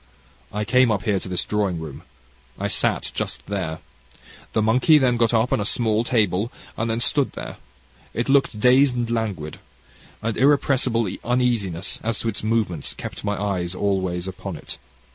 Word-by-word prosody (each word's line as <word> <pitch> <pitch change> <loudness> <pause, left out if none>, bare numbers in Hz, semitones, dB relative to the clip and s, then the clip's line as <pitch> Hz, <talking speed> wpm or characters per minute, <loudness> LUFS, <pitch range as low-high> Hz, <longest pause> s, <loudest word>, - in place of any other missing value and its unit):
I 105 +1 -2
came 125 +2 +4
up 100 -4 0
here 100 -2 +1
to 95 - -8
this 90 -1 -1
drawing 100 -5 -1
room. 80 -4 -7 0.6
I - - -3
sat - - 0
just - - -3
here. 90 -6 -2 0.8
The 110 - +2
monkey 125 +8 +5
then 130 -4 +3
got 115 -1 +2
upon 115 0 +2
a - - 0
small 110 +1 +1
table 110 -2 +1 0.2
that 115 - -1
then 115 0 0
stood 135 +3 +2
there. - - -7 0.5
It 120 +3 -2
looked 135 -5 +3
dazed 125 +3 +5
and 120 -1 -1
languid. 100 -10 -3 0.6
An 115 -1 -1
irrepressible 130 -4 +3 0.2
uneasiness 115 -8 0
as 115 -1 0
to 115 - -2
its 105 - -3
movements 110 -8 -1
kept - - -7
my 105 -1 -1
eyes 95 -3 -2
always 95 -3 -1
upon 95 -1 -6
it. - - -6
110 Hz, 165 wpm, -23 LUFS, 95-120 Hz, 0.8 s, monkey